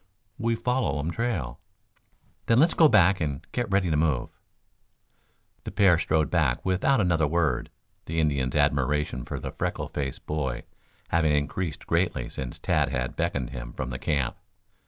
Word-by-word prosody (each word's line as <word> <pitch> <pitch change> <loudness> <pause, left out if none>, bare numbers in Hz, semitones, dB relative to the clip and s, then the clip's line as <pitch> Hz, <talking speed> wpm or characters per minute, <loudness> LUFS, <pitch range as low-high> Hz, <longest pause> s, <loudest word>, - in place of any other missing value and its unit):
"We 115 0 +1
follow 125 - 0
um 75 +4 -2
trail." 85 - -2 0.9
"Then 115 - +4
let's 160 +6 +5
go 160 - +6
back 95 - +4
and 70 -3 -3
get 120 -3 -2
ready 95 -3 +2
to - - +2
move." 75 -5 +1 1.3
The - - -5
pair 95 -5 +4
strode 80 -1 +1
back 75 -8 +1
without 95 +8 +2
another 85 -5 +2
word, 75 -5 0 0.4
the 80 +1 -2
Indian's 70 -5 0
admiration 70 -2 +1
for - - -5
the - - -5
freckle - - -3
faced 70 -2 -4
boy 65 -5 -2 0.5
having 80 -3 +2
increased 75 +2 -2
greatly 60 - 0
since 65 -2 -6
Tad - - +1
had 60 0 -2
beckoned 70 -8 -2
him - - -7
from 65 0 -4
the 65 - -5
camp. 70 -5 -1
75 Hz, 155 wpm, -26 LUFS, 65-95 Hz, 1.3 s, go